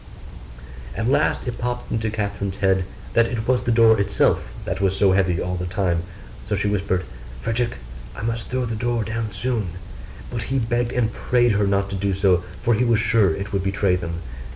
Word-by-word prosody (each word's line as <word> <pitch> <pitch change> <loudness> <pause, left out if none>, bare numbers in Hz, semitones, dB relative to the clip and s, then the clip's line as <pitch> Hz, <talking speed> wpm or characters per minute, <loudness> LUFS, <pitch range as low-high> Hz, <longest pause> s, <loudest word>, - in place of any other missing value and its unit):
At 110 - 0
last 135 - +2
it 125 -2 -4
popped 125 0 -3
into 110 -1 0
Catherine's 100 -2 -3
head 95 -2 +2 0.3
that 115 0 +4
it 115 -2 -3
was 125 -1 +3
the 120 - 0
door 115 -1 +6
itself 100 -10 +1
that 90 +2 -3
was 95 -1 +1
so 100 -2 +4
heavy 95 -3 +2
all 90 0 -2
the 90 0 -3
time: 85 -2 0 0.5
so - - +1
she - - 0
whispered, 95 -2 0 0.4
'Frederick, 115 +1 0 0.4
I - - -7
must 115 0 -2
throw 130 0 -1
the 115 -1 -3
door 120 0 0
down 110 0 -3
soon.' 105 -4 -2 0.6
But 120 -1 -3
he 135 - +1
begged 120 0 0
and 115 -3 0
prayed 120 -1 +2
her 100 -1 +2
not 100 0 +1
to - - -2
do 100 0 0
so, 95 -2 +3 0.2
for 120 - +3
he 115 +3 +2
was 120 -2 +3
sure 110 -6 +3
it 100 +1 -6
would 95 -1 0
betray 95 -1 +2
them. 85 -1 -4
105 Hz, 200 wpm, -23 LUFS, 95-115 Hz, 0.6 s, door